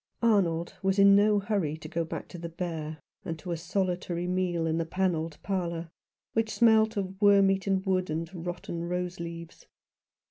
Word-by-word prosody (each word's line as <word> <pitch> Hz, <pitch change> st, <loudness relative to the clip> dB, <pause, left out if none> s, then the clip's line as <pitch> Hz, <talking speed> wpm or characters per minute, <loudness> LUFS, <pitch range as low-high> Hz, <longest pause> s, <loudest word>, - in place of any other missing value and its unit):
Arnold 175 Hz, -7 st, +2 dB
was 190 Hz, 0 st, +1 dB
in 200 Hz, 0 st, +7 dB
no 210 Hz, +1 st, +5 dB
hurry 195 Hz, -7 st, -1 dB
to 155 Hz, -, -9 dB
go 165 Hz, +2 st, -1 dB
back 160 Hz, -, -6 dB
to 175 Hz, -, -8 dB
the 170 Hz, 0 st, -5 dB
Bear 160 Hz, -2 st, -4 dB, 0.3 s
and 165 Hz, -, -4 dB
to 175 Hz, +3 st, -7 dB
a -, -, 0 dB
solitary 175 Hz, 0 st, -2 dB
meal 180 Hz, -2 st, 0 dB
in 160 Hz, 0 st, 0 dB
the -, -, +1 dB
panelled 165 Hz, -4 st, -1 dB
parlour, 170 Hz, -4 st, -2 dB, 0.4 s
which 225 Hz, -1 st, 0 dB
smelt 220 Hz, -1 st, +4 dB
of 190 Hz, 0 st, -4 dB
wormeaten 195 Hz, -1 st, +4 dB
wood 185 Hz, -2 st, +1 dB
and 160 Hz, +2 st, -2 dB, 0.2 s
rotten 175 Hz, -1 st, -4 dB
rose 180 Hz, +1 st, -3 dB
leaves. 170 Hz, -1 st, -8 dB
180 Hz, 170 wpm, -28 LUFS, 165-195 Hz, 0.4 s, in